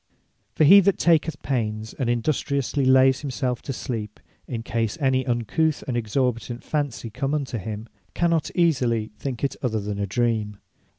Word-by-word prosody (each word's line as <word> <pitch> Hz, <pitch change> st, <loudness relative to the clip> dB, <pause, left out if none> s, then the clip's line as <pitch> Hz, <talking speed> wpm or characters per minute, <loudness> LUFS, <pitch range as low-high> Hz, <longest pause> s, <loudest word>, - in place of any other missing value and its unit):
For -, -, +3 dB
he 195 Hz, +7 st, +9 dB
that 200 Hz, 0 st, +3 dB
taketh 160 Hz, -1 st, +2 dB
pains, 110 Hz, -4 st, -2 dB
and 125 Hz, -3 st, -2 dB
industriously 140 Hz, +2 st, 0 dB
layes 130 Hz, 0 st, +5 dB
himselfe 130 Hz, -3 st, -2 dB
to -, -, -5 dB
sleep, 110 Hz, -5 st, -5 dB, 0.3 s
in 115 Hz, -3 st, -4 dB
case 115 Hz, 0 st, -2 dB
any 130 Hz, -2 st, +1 dB
uncouth 125 Hz, +7 st, 0 dB
and 125 Hz, -, -2 dB
exorbitant 120 Hz, +1 st, -1 dB
fancy 145 Hz, -7 st, -3 dB
come 135 Hz, +5 st, -1 dB
unto 135 Hz, -5 st, -3 dB
him, 110 Hz, +2 st, -6 dB, 0.3 s
cannot 170 Hz, -2 st, +1 dB
easily 125 Hz, -, +1 dB
think 130 Hz, -5 st, -5 dB
it 140 Hz, -, 0 dB
other 110 Hz, -4 st, 0 dB
than 100 Hz, 0 st, -4 dB
a 100 Hz, -, -1 dB
Dream. 110 Hz, -1 st, -1 dB
125 Hz, 160 wpm, -24 LUFS, 115-140 Hz, 0.3 s, he